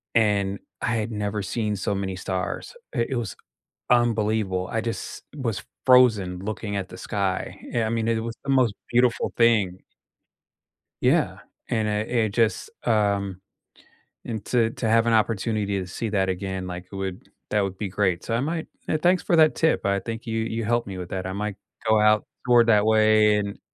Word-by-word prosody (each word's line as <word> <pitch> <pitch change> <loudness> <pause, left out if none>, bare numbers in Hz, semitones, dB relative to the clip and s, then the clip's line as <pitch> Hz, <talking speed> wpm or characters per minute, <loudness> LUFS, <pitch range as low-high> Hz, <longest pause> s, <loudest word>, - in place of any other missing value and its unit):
and 100 -3 +2 0.2
I 110 - 0
had 110 0 -2
never 105 -1 -2
seen 105 +2 -2
so 100 +1 -1
many 95 -1 -2
stars. 95 - -4 0.2
It 120 -3 0
it 130 - 0
was 105 -8 -3 0.5
unbelievable. 110 -6 +2
I 115 - 0
just 115 0 -5
was 115 -8 -3 0.2
frozen 110 -8 +5
looking 105 +1 -4
at 95 -2 -3
the - - -10
sky. 100 -3 -2 0.2
I 115 -2 +1
mean, 115 0 -1
it 115 -1 +1
was 115 0 -5
the 140 - -1
most 130 -5 +3 0.2
beautiful 120 0 +2
thing. 110 -6 +3 1.2
Yeah, - - +2 0.3
and 110 -2 0
it 105 +1 -1
it 115 -3 +2
just, 115 - +1 0.2
um 100 -3 +1 0.8
and 110 -3 -5
to 115 -3 +2
to 115 0 -3
have 115 +1 +4
an 115 - +3
opportunity 105 -2 +1
to 90 - -5
see 110 +5 -3
that 95 -2 +1
again, 95 0 -3
like, 90 0 -6
it - - -8
would 95 -2 -5 0.2
that 105 -1 +2
would 95 -1 -3
be 105 - -2
great. 95 -2 0
So 115 - -2
I 115 - +1
might, 160 +3 -2 0.2
uh, 155 - +2
thanks 180 +3 +3
for 170 - +2
that 155 -1 +6
tip. 160 -1 +2
I 100 0 +2
think 115 +3 -6
you 115 -1 -1
you 115 0 -2
helped 120 +2 +1
me 95 -2 -6
with 90 -1 -6
that. 95 -1 -3
I 95 - -3
might 105 0 -3 0.3
go 110 -1 +5
out 105 0 +4 0.2
toward 120 -1 +5
that 105 -1 +5
way 110 -1 +5
and 100 -1 -3
110 Hz, 190 wpm, -25 LUFS, 100-115 Hz, 1.2 s, that